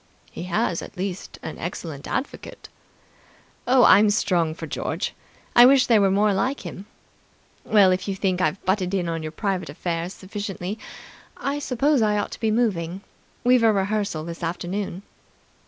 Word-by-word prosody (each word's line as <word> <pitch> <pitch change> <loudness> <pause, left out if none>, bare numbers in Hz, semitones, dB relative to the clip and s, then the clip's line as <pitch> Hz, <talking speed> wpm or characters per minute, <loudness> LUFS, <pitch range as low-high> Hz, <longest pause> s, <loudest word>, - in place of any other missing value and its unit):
"He 170 - -7
has 170 -1 0
at - - -10
least 190 0 -5
an 160 - -6
excellent 160 -4 -6
advocate." 265 - -5 1.0
"Oh, 255 0 +5
I'm 210 -1 +7
strong 175 -6 +1
for - - -6
George. - - -3 0.4
I 240 - +9
wish 270 -1 +5
there 225 -3 +4
were 195 - +4
more 205 +2 +3
like 255 +9 -1
him... 195 +3 -8 0.8
Well, 200 -3 +5
if 185 +1 -1
you 195 - -1
think 185 -2 0
I've 190 +1 -1
butted 190 0 0
in 180 -3 -1
on 165 -1 -2
your 155 0 -5
private 190 0 -2
affairs 170 +4 -3
sufficiently, 200 0 -5 0.6
I 280 +1 -2
suppose 280 0 +1
I 210 -1 +2
ought 205 - -2
to - - -8
be 220 - +1
moving. 195 -6 0 0.4
We've 250 0 +5
a 225 -1 +5
rehearsal 200 -4 -1
this 170 +1 -7
afternoon." 180 +3 -3
195 Hz, 165 wpm, -24 LUFS, 175-215 Hz, 1.0 s, I